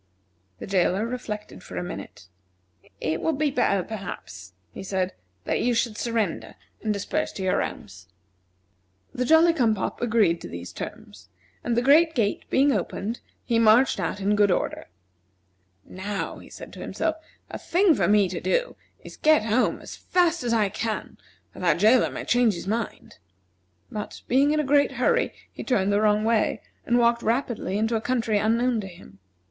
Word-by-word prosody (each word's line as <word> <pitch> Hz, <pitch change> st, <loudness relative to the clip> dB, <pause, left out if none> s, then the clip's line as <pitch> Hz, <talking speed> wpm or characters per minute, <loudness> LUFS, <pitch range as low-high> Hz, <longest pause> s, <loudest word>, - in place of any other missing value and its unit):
The -, -, -7 dB
jailer 190 Hz, +2 st, +1 dB
reflected 210 Hz, -, -6 dB
for 90 Hz, -, -9 dB
a 90 Hz, -, -2 dB
minute. 85 Hz, +3 st, -8 dB, 0.7 s
"It 160 Hz, 0 st, -2 dB
would 320 Hz, -3 st, 0 dB
be 300 Hz, -1 st, +1 dB
better, 200 Hz, -7 st, +1 dB
perhaps," 180 Hz, -, -8 dB, 0.2 s
he -, -, -9 dB
said, 190 Hz, -1 st, -2 dB, 0.3 s
"that -, -, -1 dB
you 245 Hz, 0 st, +1 dB
should 230 Hz, -1 st, 0 dB
surrender 225 Hz, -4 st, -2 dB, 0.3 s
and 215 Hz, -, -1 dB
disperse 210 Hz, +10 st, -2 dB
to 190 Hz, -, -5 dB
your 185 Hz, -, +1 dB
homes." 95 Hz, -2 st, -7 dB, 1.1 s
The 250 Hz, -, -1 dB
Jolly 325 Hz, +4 st, +5 dB
cum 235 Hz, -8 st, +2 dB
pop 195 Hz, -, -4 dB
agreed 215 Hz, -8 st, +2 dB
to -, -, -7 dB
these 85 Hz, 0 st, -8 dB
terms, 95 Hz, +1 st, -9 dB, 0.3 s
and 235 Hz, -1 st, -1 dB
the 240 Hz, -, +2 dB
great 315 Hz, +5 st, +5 dB
gate 215 Hz, -5 st, 0 dB
being 280 Hz, +2 st, +3 dB
opened, 215 Hz, +1 st, -3 dB, 0.3 s
he 230 Hz, -1 st, +1 dB
marched 225 Hz, +2 st, +5 dB
out 185 Hz, +2 st, -2 dB
in 205 Hz, +1 st, +1 dB
good 205 Hz, -1 st, +4 dB
order. 180 Hz, -, -1 dB, 1.0 s
"Now," 195 Hz, +2 st, -5 dB
said -, -, -10 dB
he -, -, -18 dB
to -, -, -11 dB
himself, 320 Hz, -1 st, -2 dB, 0.3 s
"the -, -, -6 dB
thing 360 Hz, 0 st, +3 dB
for -, -, +1 dB
me 205 Hz, -1 st, +4 dB
to -, -, -5 dB
do -, -, 0 dB, 0.3 s
is -, -, -11 dB
to -, -, -39 dB
get 310 Hz, -8 st, +4 dB
home 225 Hz, +3 st, +1 dB
as -, -, -9 dB
fast 345 Hz, -4 st, +1 dB
as 240 Hz, -, -1 dB
I 215 Hz, -3 st, +2 dB
can, 220 Hz, +1 st, -4 dB, 0.3 s
or -, -, -10 dB
that 180 Hz, -, +3 dB
jailer 220 Hz, +7 st, +4 dB
may -, -, -6 dB
change 245 Hz, -4 st, +3 dB
his 170 Hz, -, -7 dB
mind." 220 Hz, +2 st, -4 dB, 0.7 s
But, 210 Hz, -1 st, -6 dB
being 270 Hz, +4 st, +3 dB
in 305 Hz, +1 st, +2 dB
a -, -, +1 dB
great 285 Hz, +1 st, +3 dB
hurry, 485 Hz, 0 st, +1 dB, 0.2 s
he -, -, -7 dB
turned 200 Hz, -6 st, +1 dB
the 205 Hz, -, +2 dB
wrong 210 Hz, 0 st, +3 dB
way, 225 Hz, -1 st, +1 dB, 0.2 s
and 240 Hz, -, +3 dB
walked 235 Hz, 0 st, +3 dB
rapidly 225 Hz, -4 st, -1 dB
into 225 Hz, +2 st, 0 dB
a 220 Hz, -, 0 dB
country 225 Hz, -4 st, 0 dB
unknown 230 Hz, +2 st, +1 dB
to 195 Hz, -, -7 dB
him. 170 Hz, -, -15 dB
220 Hz, 180 wpm, -25 LUFS, 195-250 Hz, 1.1 s, Jolly